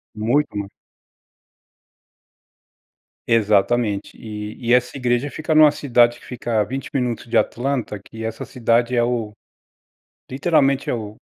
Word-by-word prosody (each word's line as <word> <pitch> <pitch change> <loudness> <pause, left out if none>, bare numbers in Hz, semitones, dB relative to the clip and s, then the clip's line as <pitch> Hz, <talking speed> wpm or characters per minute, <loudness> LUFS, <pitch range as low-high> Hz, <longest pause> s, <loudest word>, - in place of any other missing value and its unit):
Muito 120 +5 0
mais. 100 -1 -3 2.6
Exatamente. 105 -1 +1
E 105 -1 -7
e 120 0 0
essa 125 +2 +1
igreja 125 +2 0
fica 155 +4 -2
numa 155 -1 +8
cidade 120 -5 +2
que - - -18
fica 120 -3 -2
a - - +2
20 135 +6 -6
minutos 125 -3 -2
de 115 - -2
Atlanta, 125 -4 0
que 110 +2 -9
essa 115 0 -4
cidade 120 0 +1
é 120 - +3
o 120 -3 -2 1.0
literalmente, 140 -1 +1
é - - +1
o 110 -2 -6
120 Hz, 135 wpm, -21 LUFS, 110-130 Hz, 2.6 s, numa